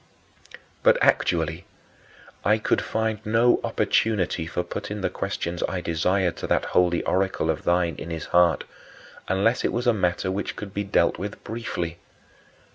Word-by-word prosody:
4. - - -12 0.2
But - - +5
actually - - +1 0.8
I 105 +3 +4
could 110 - +1
find 110 -1 -2
no 115 +3 +3
opportunity 90 -6 0
of 90 0 -1
putting 105 0 -4
the - - -1
questions 85 0 -3
I 95 - -2
desired 90 +2 0
to - - -4
that - - +1
holy 90 -1 +3
oracle 95 +1 +1
of - - -6
thine 85 -1 +2
in 85 - -7
his 80 -2 -4
heart, 85 -2 +4 0.6
unless 100 +6 +1
it - - +1
was 120 +2 -2
a 120 - +4
matter 90 -2 0
which 100 +2 -3
could 100 -2 -7
be 100 - -1
dealt 95 -4 +1
with 100 +2 -6
briefly. 90 -7 -4
95 Hz, 160 wpm, -25 LUFS, 85-105 Hz, 0.8 s, But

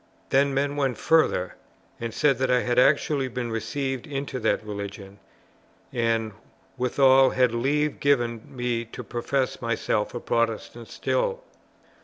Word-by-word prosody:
Then 140 +1 +4
men 140 +1 0
went 135 -5 0
further, 155 - +2 0.5
and 115 -1 -4
said 135 +3 +2
that 130 -1 +1
I 125 0 +3
had 125 0 +1
actually 140 0 +3
been 120 -1 -4
received 135 +3 -3
into 135 -2 -4
that 110 -1 0
religion, 100 -1 -7 0.7
and 115 -2 0 0.4
withal 130 +1 +4
had 125 -2 +2
leave 145 +5 0
given 120 -5 +1
me 120 -2 -2
to 115 - -9
profess 130 +2 -2
myself 115 -2 -1
a - - -2
Protestant 115 0 -2
still. - - -1
125 Hz, 135 wpm, -25 LUFS, 115-140 Hz, 0.7 s, Then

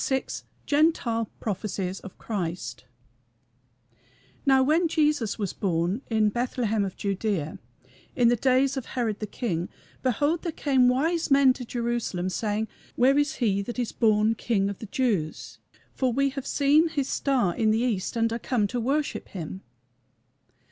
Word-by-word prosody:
VI 265 -2 +1 0.4
GENTILE 285 -7 +2
PROPHECIES 195 -2 -3
OF 195 - -11
CHRIST 170 - -4 1.6
"Now 265 -1 +6
when 320 +5 +3
Jesus 300 -8 +1
was 200 -4 -2
born 180 +4 -1
in 220 -2 +3
Bethlehem 235 -2 0
of 190 -2 -5
Judæa, 195 -6 -2 0.6
in 245 -2 +4
the 240 - +5
days 260 +3 +2
of 265 -3 -4
Herod 225 -5 -2
the 215 - -4
king, 180 -6 -3 0.3
behold 290 +6 +1
there 340 - -3
came 265 -5 +3
wise 320 +7 +1
men 275 -2 +6
to 255 - -7
Jerusalem, 235 -7 -2
saying, 210 +3 -1 0.3
Where 270 +3 +4
is 290 +1 0
he 200 -5 +1
that 235 +5 -6
is 245 -2 -1
born 215 -1 +3
King 200 -3 0
of 200 - -9
the 220 - -7
Jews? 200 -10 -2 0.3
for 260 -2 0
we 275 +3 +1
have 275 -1 -6
seen 295 +3 +4
his 285 -4 -1
star 250 -14 +1
in 220 -1 +2
the 220 +2 +2
east, 215 -7 -1
and 230 0 +1
are 230 - -2
come 235 -3 0
to 245 - -2
worship 280 +5 -1
him." 185 +1 -7
235 Hz, 155 wpm, -26 LUFS, 200-270 Hz, 1.6 s, Now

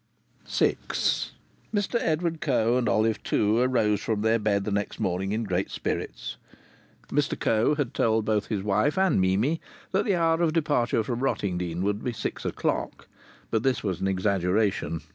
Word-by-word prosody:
VI - - +2 0.9
Mr 205 +3 0
Edward 165 -1 -1
Coe 120 -5 +2
and 125 -1 +1
Olive 110 0 +2
Two 105 +2 +2
arose 115 -5 +2
from 105 -1 -1
their 110 +1 +3
bed 100 -2 +1
the 105 - -3
next 100 0 -2
morning 95 +2 -1
in 110 +2 -1
great 95 -2 -1
spirits. - - -4 0.7
Mr 145 0 0
Coe 115 +7 +2
had 145 -5 -2
told 110 -1 +2
both 105 -2 0
his 100 -4 -2
wife 105 - +1
and 190 - +3
Mimi 105 - +1 0.3
that 190 - +2
the 200 -5 +2
hour 165 -1 +2
of 165 -2 +2
departure 145 -8 +1
from 120 +1 -3
Rottingdean 90 -9 -1
would 105 +1 -1
be 125 - -2
six 110 - -4
o'clock. - - -2 0.4
But 110 - +2
this 130 +1 0
was 95 -5 -2
an 95 - +1
exaggeration. 95 -2 0
110 Hz, 165 wpm, -26 LUFS, 100-135 Hz, 0.9 s, their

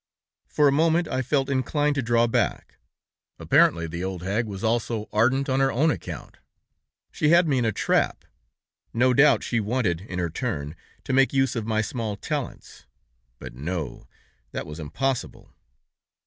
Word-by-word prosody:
"For 150 - +3
a - - +4
moment 165 +3 +2
I 130 - -1
felt 135 +1 0
inclined 145 +2 0
to 140 - -1
draw 120 0 +2
back. 115 - -1 0.6
Apparently 85 -1 +3
the 85 +2 -5
old 95 -2 -4
hag 105 +5 -1
was 100 -1 -7
also 115 -1 -1
ardent 130 +6 +2
on 130 0 +1
her 135 0 +3
own 155 +6 +2
account! - - -7 0.7
She 150 - +1
had 170 +1 +5
me 135 -4 +2
in 120 - 0
a 110 - +2
trap! - - 0 0.7
No 125 +2 +4
doubt 140 -3 +5
she 120 - 0
wanted 105 -6 -1
in 95 -2 -7
her 85 -2 -1
turn 80 - -4 0.3
to 135 - -3
make 135 +1 +4
use 135 -2 +1
of 115 -2 -3
my 110 -1 +1
small 110 -2 -3
talents! 145 +4 -6 0.5
But, - - -9
no! 80 +5 -5 0.5
That - - -4
was 75 +1 -8
impossible! 125 - -3
120 Hz, 165 wpm, -25 LUFS, 100-135 Hz, 0.7 s, had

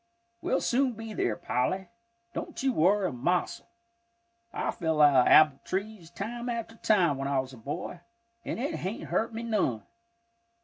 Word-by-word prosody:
We'll - - 0
soon 255 0 +2
be 225 0 -7
there, 115 - 0
Polly, 185 - -1 0.5
don't - - -5
you 265 -1 +2
worry 190 +2 +3
a - - -6
mossel. 155 +9 -1 0.8
I - - -2
fell 160 -2 -1
out 140 -4 +6
o' - - +4
apple 150 -3 +7
trees 195 -3 -4
time 235 +7 -5
after 230 -1 -4
time 175 -12 +2
when 135 - -2
I 140 -1 +1
was 130 0 -4
a - - -11
boy, 145 +9 -5 0.4
and - - -4
it 285 +6 -2
hain't 190 +5 -5
hurt 225 - 0
me 225 +1 -5
none. 205 - 0
185 Hz, 170 wpm, -29 LUFS, 145-225 Hz, 0.8 s, apple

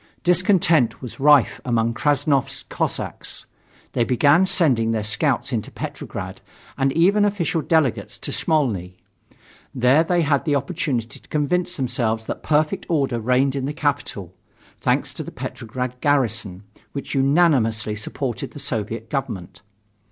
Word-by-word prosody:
Discontent 175 - +3
was 125 - -8
rife 145 -3 +4
among 115 -2 +1
Krassnov's 145 0 0
Cossacks. - - -3 0.5
They 120 - +2
began 145 +9 +4
sending 130 -12 +3
their 110 -2 -1
scouts 105 0 0
into - - -2
Petrograd - - -6 0.3
and 135 0 +1
even 195 +5 +4
official 185 -5 0
delegates 155 -6 0
to - - -5
Smolny. 105 - 0 0.8
There 130 +5 +4
they 175 0 +1
had 145 -2 +1
the 150 -3 +1
opportunity 140 -5 -2
to - - -24
convince 180 +5 0
themselves 120 -4 -1
that - - -5
perfect 155 +5 0
order 135 -7 +1
reigned 130 +4 +2
in 135 -1 -2
the 145 - -3
capital, 120 - -2 0.4
thanks - - 0
to - - -6
the - - -7
Petrograd 125 +2 -5
garrison, 115 -9 +1 0.3
which 140 - -5
unanimously 135 -7 +2
supported 120 +3 -4
the - - -8
Soviet 115 -4 -3
government. 95 - -4
135 Hz, 135 wpm, -22 LUFS, 115-155 Hz, 0.8 s, rife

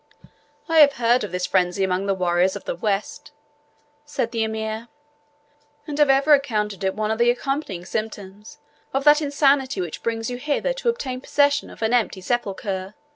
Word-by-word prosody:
"I 325 -1 +3
have 285 -2 +7
heard 240 -1 +2
of 210 - -5
this 180 0 -2
frenzy 180 +1 +1
among 190 +1 -1
the 195 - +1
warriors 180 0 +1
of - - -7
the - - -3
West," 200 +2 -3 0.7
said 295 -6 -3
the 230 -2 0
Emir, 220 +1 -4 1.0
"and 300 -1 -5
have 295 -2 +5
ever 275 +3 +5
accounted 210 -9 0
it 190 0 0
one 215 0 -1
of 220 - -2
the 235 0 +4
accompanying 245 - -2
symptoms 210 -1 -6 0.4
of 270 - +1
that 295 +1 +6
insanity 280 -4 +2
which 175 -4 -4
brings 225 -1 -2
you 245 - -4
hither 295 - -1
to - - -1
obtain 260 - -3
possession 285 +1 +1
of - - -9
an 220 +2 +1
empty 225 -5 +1
sepulchre. 195 -2 -3
225 Hz, 180 wpm, -23 LUFS, 195-275 Hz, 1.0 s, have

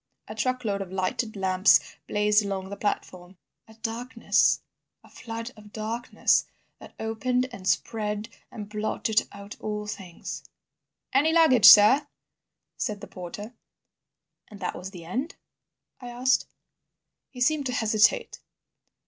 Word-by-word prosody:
A - - -7
truckload 220 -3 -1
of 190 -2 -7
lighted 190 +4 -2
lamps 190 0 +4 0.3
blazed 210 +1 +3
along 190 -1 -4
the - - -4
platform. 185 -3 -4 0.3
"A 220 - -16
darkness, 230 +3 +1 0.4
a - - -18
flood 230 +1 -7
of 210 -1 -15
darkness 225 +3 0 0.3
that - - -14
opened 250 +3 -1
and 195 -6 -8
spread 210 -1 -1 0.2
and 210 -3 -7
blotted 215 +1 -1
out 200 0 -10
all 210 0 -3
things." 190 -4 -7 0.7
"Any 290 +4 +4
luggage, 320 -9 +5
sir?" 260 +8 +8 0.7
said 210 -2 -3
the - - -7
porter. 205 +5 -8 0.9
"And 205 - -13
that 180 - -3
was 185 - -7
the 175 -4 -11
end?" 255 - -4 0.6
I 245 -2 -8
asked. 250 +2 +1 0.8
He 250 - -12
seemed 285 +2 +2
to 250 - -3
hesitate. 215 -2 +2
215 Hz, 130 wpm, -26 LUFS, 200-245 Hz, 0.9 s, sir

